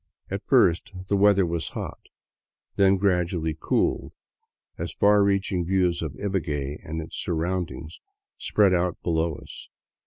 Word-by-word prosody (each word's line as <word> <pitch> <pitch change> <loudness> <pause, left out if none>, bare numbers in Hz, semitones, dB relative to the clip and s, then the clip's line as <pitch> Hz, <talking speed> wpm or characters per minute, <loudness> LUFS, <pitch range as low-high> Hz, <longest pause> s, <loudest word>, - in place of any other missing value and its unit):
At - - -3
first 85 +3 +3 0.2
the 100 - +2
weather 100 -1 +4
was 85 -1 -2
hot, - - -7 0.7
then 95 0 +4
gradually 90 -4 0
cooled - - 0 0.6
as - - -5
far 105 0 +4
reaching 100 -2 +1
views 90 -1 +1
of 80 -4 -4
Ibague 75 -8 -2
and 80 0 -4
its 80 - -8
surroundings 85 -1 -3 0.4
spread 100 -3 +3
out 90 0 0
below 80 -1 0
us. - - -11
90 Hz, 130 wpm, -25 LUFS, 80-95 Hz, 0.7 s, weather